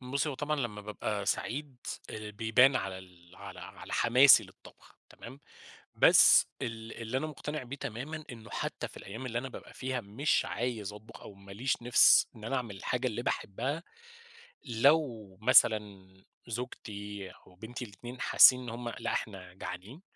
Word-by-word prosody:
بُصّي، 135 Hz, +4 st, -2 dB
هو 145 Hz, -, -3 dB
طبعًا 150 Hz, +3 st, -2 dB
لمّا 120 Hz, -7 st, -3 dB
بابقى 105 Hz, -1 st, -4 dB
سعيد 140 Hz, +1 st, -2 dB, 0.3 s
آآ، 110 Hz, -1 st, -7 dB
بيبان 115 Hz, +5 st, +4 dB
على 95 Hz, -1 st, -4 dB
ال 90 Hz, -1 st, -17 dB
على -, -, -10 dB
على -, -, -10 dB
حماسي 125 Hz, -1 st, +6 dB
للطبخ 95 Hz, -, -18 dB
تمام، 130 Hz, +4 st, -12 dB, 0.5 s
بس -, -, +7 dB, 0.2 s
ال 110 Hz, -1 st, -5 dB
اللي 115 Hz, +3 st, -2 dB
أنا 155 Hz, -, -3 dB
مقتنع 150 Hz, 0 st, -5 dB
بيه 130 Hz, +2 st, -7 dB
تمامًا، 145 Hz, +6 st, -6 dB
إنه 115 Hz, -2 st, -12 dB
حتى -, -, -4 dB
في -, -, -17 dB
الأيام 110 Hz, +7 st, -8 dB
اللي 120 Hz, -1 st, -2 dB
أنا 135 Hz, +3 st, -5 dB
بابقى -, -, -11 dB
فيها 130 Hz, -1 st, -3 dB
مش 120 Hz, +8 st, 0 dB
عايز 115 Hz, -5 st, -3 dB
أطبخ، 105 Hz, +1 st, -13 dB
أو 100 Hz, -, -11 dB
ما 100 Hz, 0 st, -14 dB
ليش 125 Hz, +4 st, -2 dB
نِفس 120 Hz, 0 st, +6 dB
إن 110 Hz, -, -12 dB
أنا 135 Hz, +4 st, -2 dB
اعمل 115 Hz, -6 st, -4 dB
الحاجة 125 Hz, +6 st, -2 dB
اللي 120 Hz, +1 st, -4 dB
باحبها، 135 Hz, -, -3 dB, 0.8 s
لو 120 Hz, -6 st, +1 dB
مثلًا 105 Hz, -4 st, +3 dB, 0.4 s
زوجتي 105 Hz, -4 st, -6 dB
أو 90 Hz, -, -19 dB
بنتي 120 Hz, +5 st, -7 dB
الاتنين 120 Hz, +3 st, -10 dB
حاسّين 130 Hz, -1 st, +7 dB
إن 125 Hz, -, -9 dB
هُم 120 Hz, +1 st, -5 dB
لأ 115 Hz, -, -4 dB
إحنا 90 Hz, -4 st, -5 dB
جعانين، 95 Hz, -, -8 dB
115 Hz, 165 wpm, -30 LUFS, 105-130 Hz, 0.8 s, بس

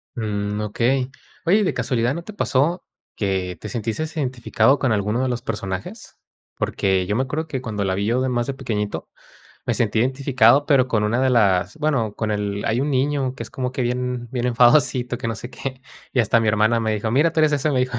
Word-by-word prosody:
Mm, 105 Hz, -2 st, -2 dB
okey. 125 Hz, +5 st, 0 dB, 0.3 s
Oye, 205 Hz, +5 st, +4 dB
¿de 185 Hz, -, 0 dB
casualidad 120 Hz, -1 st, 0 dB
no 170 Hz, -, -5 dB
te 215 Hz, -, -9 dB
pasó 165 Hz, 0 st, +1 dB, 0.3 s
que 95 Hz, -3 st, -2 dB
te 110 Hz, -, -7 dB
sentiste 115 Hz, +6 st, -2 dB
identificado 130 Hz, 0 st, +1 dB
con 130 Hz, -, +1 dB
alguno 105 Hz, +3 st, 0 dB
de 130 Hz, -, 0 dB
los 120 Hz, -1 st, -2 dB
personajes? 110 Hz, -, -5 dB, 0.4 s
Porque 95 Hz, -2 st, 0 dB
yo 105 Hz, +3 st, -1 dB
me 130 Hz, -, +2 dB
acuerdo 155 Hz, +4 st, -3 dB
que 130 Hz, -4 st, -4 dB
cuando 105 Hz, -5 st, -3 dB
la 95 Hz, -, 0 dB
vi 100 Hz, +2 st, -1 dB
yo 120 Hz, +3 st, +2 dB
de 130 Hz, -, 0 dB
más 120 Hz, 0 st, -1 dB
de 135 Hz, -, -3 dB
pequeñito, 105 Hz, -6 st, -3 dB, 0.6 s
me -, -, +1 dB
sentí 110 Hz, -1 st, 0 dB
identificado 130 Hz, +1 st, +3 dB
pero 135 Hz, -4 st, +4 dB
con 110 Hz, -4 st, +1 dB
una 115 Hz, +4 st, +1 dB
de 130 Hz, -, +3 dB
las 100 Hz, -3 st, +2 dB
bueno, 135 Hz, -9 st, 0 dB
con 110 Hz, -1 st, -2 dB
el 105 Hz, -1 st, -2 dB
hay 115 Hz, +3 st, +1 dB
un 140 Hz, -, 0 dB
niño 135 Hz, -1 st, 0 dB
que -, -, -6 dB
es -, -, -9 dB
como 130 Hz, -1 st, -3 dB
que 130 Hz, -, -2 dB
bien, 125 Hz, 0 st, -2 dB
bien 125 Hz, -1 st, -1 dB
enfadosito, 125 Hz, 0 st, +3 dB
que -, -, -4 dB
no 115 Hz, -, -2 dB
sé 120 Hz, +3 st, -8 dB
qué. 130 Hz, -1 st, -6 dB, 0.3 s
Y 125 Hz, -, +3 dB
hasta 115 Hz, +1 st, +3 dB
mi 115 Hz, -, 0 dB
hermana 110 Hz, +2 st, +3 dB
me 110 Hz, -1 st, 0 dB
dijo: 110 Hz, +1 st, -2 dB
"Mira, 150 Hz, +7 st, +3 dB
tú 160 Hz, -, +1 dB
eres 155 Hz, -1 st, +4 dB
eso", 145 Hz, +1 st, +1 dB
me 130 Hz, -, +2 dB
dijo, 125 Hz, -1 st, -1 dB
125 Hz, 225 wpm, -22 LUFS, 110-135 Hz, 0.6 s, Oye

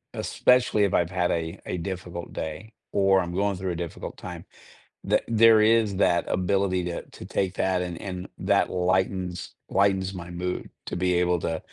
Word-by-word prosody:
especially 125 Hz, -4 st, +3 dB
if 100 Hz, -, -1 dB
I've 85 Hz, 0 st, +1 dB
had 90 Hz, -2 st, +1 dB
a 80 Hz, +2 st, -2 dB
a -, -, -2 dB
difficult 85 Hz, -1 st, -6 dB
day 85 Hz, +8 st, -6 dB, 0.2 s
or 95 Hz, -1 st, +4 dB
I'm 85 Hz, 0 st, -5 dB
going 100 Hz, 0 st, +1 dB
through 90 Hz, -1 st, -2 dB
a 85 Hz, -, -3 dB
difficult 85 Hz, -, -8 dB
time, -, -, -8 dB, 0.6 s
the -, -, +3 dB
there 115 Hz, -1 st, +6 dB
is 110 Hz, -2 st, +3 dB
that 85 Hz, -2 st, +2 dB
ability 95 Hz, 0 st, +1 dB
to 85 Hz, -1 st, -3 dB
to -, -, -11 dB
take 95 Hz, -1 st, -1 dB
that 95 Hz, -1 st, +1 dB
and 90 Hz, -2 st, -4 dB
and 90 Hz, -2 st, -6 dB
that -, -, +2 dB
lightens 90 Hz, 0 st, -1 dB
lightens 95 Hz, -1 st, +2 dB
my 90 Hz, -2 st, -7 dB
mood 90 Hz, +1 st, -4 dB, 0.2 s
to -, -, -4 dB
be 90 Hz, 0 st, +1 dB
able 90 Hz, 0 st, +2 dB
to 80 Hz, 0 st, -2 dB
90 Hz, 180 wpm, -26 LUFS, 90-100 Hz, 0.6 s, there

